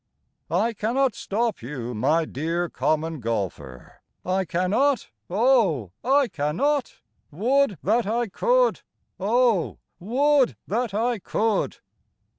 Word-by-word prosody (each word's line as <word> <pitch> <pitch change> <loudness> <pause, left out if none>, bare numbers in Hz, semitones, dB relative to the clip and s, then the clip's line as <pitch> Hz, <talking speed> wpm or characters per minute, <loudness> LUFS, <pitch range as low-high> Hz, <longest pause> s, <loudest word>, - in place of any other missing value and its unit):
I 205 +9 +1
cannot 240 +4 +1
stop 225 +2 -2
you, 125 -1 -5
my 150 +9 +1
dear 165 +5 -2
Common 155 0 -1
Golfer, 100 - -5 0.2
I 185 +1 0
cannot, 210 +12 +1 0.2
O 195 - +2
I 270 +2 +3
cannot! 235 - -1 0.3
Would 235 - +1
that 220 +3 +2
I 235 +3 0
could. - - +2 0.4
O 220 -2 +2 0.2
would 265 +7 +2
that 225 0 -2
I 235 +1 0
could! 215 +2 -1
205 Hz, 105 wpm, -24 LUFS, 160-245 Hz, 0.4 s, I